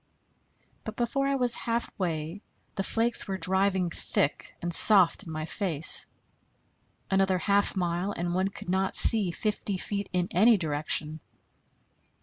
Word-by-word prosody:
But 220 - -8
before 275 +3 -2
I 275 - 0
was 250 -3 +3
halfway 185 -7 -3 0.3
the 200 - -3
flakes 230 +4 -1
were 190 -1 -4
driving 190 0 0
thick 145 - -2
and 175 0 -4
soft 190 -2 +7
in - - -7
my 155 0 -5
face. 170 -2 -1 1.0
Another 190 -1 +1
half 200 +4 0
mile, 175 +1 -2
and 175 -2 -4
one 185 +2 0
could 195 - -10
not 190 +1 -1
see 215 -5 +4
fifty 205 +1 -2
feet 200 +2 -5
in 180 -1 -1
any 220 +5 +4
direction. 155 -1 -2
190 Hz, 135 wpm, -27 LUFS, 170-205 Hz, 1.0 s, soft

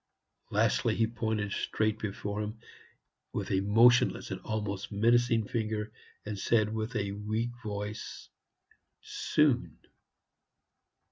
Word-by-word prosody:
Lastly, - - +2
he 115 - +3
pointed 110 -2 -2
straight 110 +1 0
before 105 0 -3
him 105 +2 -4 0.8
with - - -3
a 95 - +3
motionless 115 +5 +4
and - - -4
almost 105 -2 -3
menacing 115 +1 +3
finger, 110 -1 -2 0.3
and 105 -2 -4
said 110 0 +2
with 110 +3 -3
a 100 -2 -1
weak 110 +4 -2
voice, 105 0 -5 0.8
"Soon." 145 -5 +1
110 Hz, 110 wpm, -30 LUFS, 105-115 Hz, 0.8 s, motionless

